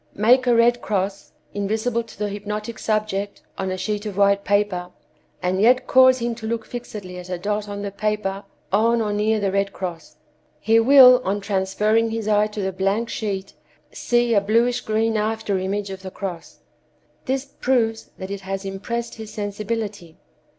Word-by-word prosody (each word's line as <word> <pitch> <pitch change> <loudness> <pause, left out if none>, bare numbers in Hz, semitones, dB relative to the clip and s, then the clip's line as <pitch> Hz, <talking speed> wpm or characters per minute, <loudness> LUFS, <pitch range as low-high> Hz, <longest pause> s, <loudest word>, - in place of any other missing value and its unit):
Make 250 +5 +4
a 240 - +5
red 240 +1 +4
cross, 195 0 -2 0.2
invisible 220 +4 -1
to 230 -1 -14
the 210 0 -1
hypnotic 210 +2 -5
subject, 210 -2 -2
on 190 0 -3
a 185 - -3
sheet 210 +3 -3
of 200 -2 -6
white 200 0 +3
paper, 200 -3 0 0.5
and 185 +2 0
yet 250 +3 +4
cause 260 0 +6
him 235 -1 -2
to 220 - -4
look 225 -1 -2
fixedly 210 -7 -7
at 180 0 -10
a 180 - -2
dot 205 +3 -2
on 200 0 -5
the 200 - -4
paper 200 -1 -2 0.3
on 230 +4 +3
or 210 -2 -1
near 215 +1 +1
the 200 -2 0
red 195 0 0
cross; 175 -5 -6 0.4
he 225 +1 +4
wills 255 +1 +8
on 200 +2 -1
transferring 210 +3 +1
his 225 -1 -3
eye 210 0 +3
to 210 -1 -5
the 190 - -1
blank 195 +5 -1
sheet, 195 -3 -4 0.4
see 240 -1 +1
a 200 - +4
bluish 230 +4 +2
green 220 +1 0
after 215 -2 -1
image 195 +1 -2
of 190 0 -7
the 190 - -7
cross. 185 -3 -7 0.6
This 265 +1 -1
proves 240 -5 -1
that 190 +1 -7
it 200 -1 -5
has 195 0 -5
impressed 230 +5 -4
his 220 -1 -9
sensibility. 205 -4 -4
210 Hz, 180 wpm, -22 LUFS, 195-225 Hz, 0.6 s, wills